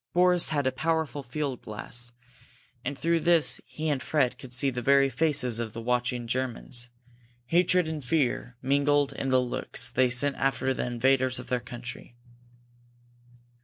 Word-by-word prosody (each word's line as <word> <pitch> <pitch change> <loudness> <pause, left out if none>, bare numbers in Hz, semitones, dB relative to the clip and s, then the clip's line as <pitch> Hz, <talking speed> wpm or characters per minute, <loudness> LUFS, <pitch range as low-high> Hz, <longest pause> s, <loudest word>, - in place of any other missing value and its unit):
Boris 180 0 +4
had 145 -3 0
a 130 - +2
powerful 160 0 -1
field 135 0 -4
glass, 120 +3 -5 0.7
and 140 +2 -4
through 170 +2 +1
this 170 -1 +4
he 155 +1 -5
and 145 -4 0
Fred 135 -5 0
could 130 - -11
see 130 +2 +1
the 125 -1 -4
very 135 +2 +4
faces 135 -4 +1
of 115 -2 -4
the 115 - -6
watching 125 +1 -1
Germans. 125 0 -1 0.6
Hatred 175 +4 +3
and 155 -2 -4
fear 125 -3 -1
mingled 140 +1 +2
in 135 - -3
the 130 0 +4
looks 125 -1 -1
they 130 +1 +3
sent 135 +3 +3
after 135 -1 0
the 125 - -3
invaders 130 +1 +1
of - - -8
their 125 -1 +1
country. 120 0 -9
130 Hz, 160 wpm, -27 LUFS, 125-145 Hz, 0.7 s, Boris